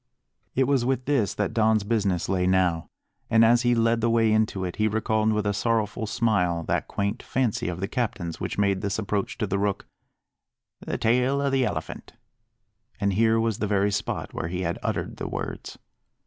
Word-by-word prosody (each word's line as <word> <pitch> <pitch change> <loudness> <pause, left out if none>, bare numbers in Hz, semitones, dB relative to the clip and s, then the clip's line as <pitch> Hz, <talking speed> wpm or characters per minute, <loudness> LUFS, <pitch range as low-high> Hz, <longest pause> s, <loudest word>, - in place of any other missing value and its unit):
It 135 - +3
was 135 -2 +2
with 130 0 -1
this 130 -9 +1
that 105 -2 -1
Don's 110 -2 +3
business 100 -6 0
lay 90 -1 +1
now; 90 -4 +1 0.4
and 115 0 +5
as 120 +1 +5
he 120 -1 +2
led 115 0 +2
the 115 - +2
way 115 -1 +3
into 110 -3 +1
it 90 - -5
he 110 - +2
recalled 110 0 +1
with 105 -1 0
a 100 - +1
sorrowful 110 +1 -1
smile 90 -7 +1
that - - -1
quaint 100 0 -2
fancy 125 -4 -1
of 90 -1 -3
the 95 - -2
captain's 100 -8 -3
which - - -4
made 100 -2 +1
this 100 -1 -2
approach 105 -2 -2
to 110 - -1
the 100 0 -1
Rook 100 -1 -1 0.9
"the - - -4
tail 125 +4 +2
o' 140 -1 0
the 135 -1 +2
Elephant." - - -5 0.9
And 100 -1 +1
here 115 +2 +3
was 115 -1 0
the 105 - -1
very 100 0 +2
spot 105 +1 -3
where - - -3
he 90 +2 -3
had 85 -1 -2
uttered - - -3
the - - -4
words. - - -6
110 Hz, 195 wpm, -25 LUFS, 100-115 Hz, 0.9 s, and